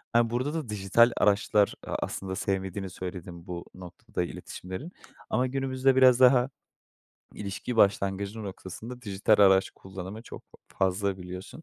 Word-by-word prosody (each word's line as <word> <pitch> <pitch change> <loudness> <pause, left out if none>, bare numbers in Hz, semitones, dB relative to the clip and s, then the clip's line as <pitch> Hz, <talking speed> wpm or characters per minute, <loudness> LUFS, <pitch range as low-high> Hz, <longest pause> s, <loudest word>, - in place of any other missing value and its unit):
Eee, 120 -1 +4
burada 125 +5 -1
da 155 -8 -4
dijital 105 +4 +4
araçlar; 105 0 +3
a - - -3
aslında 95 -1 -4
sevmediğini 95 -1 -2
söyledin 90 -1 -8
bu 85 -1 -6
noktada, 90 -1 -5
iletişimleri. 95 - -7 0.4
Ama 130 +1 +1
günümüzde 135 0 +1
biraz 130 -1 +6
daha 125 0 +6 0.9
ilişki 105 +4 -5
başlangıcı 100 +1 +2
noktasında 110 +5 -8
dijital 100 0 +2
araç 95 -1 +5
kullanımı 95 +3 -9
çok - - -10
fa - - -22
fazla 95 +1 +1
biliyorsun. 90 - -9
100 Hz, 135 wpm, -28 LUFS, 95-120 Hz, 0.9 s, biraz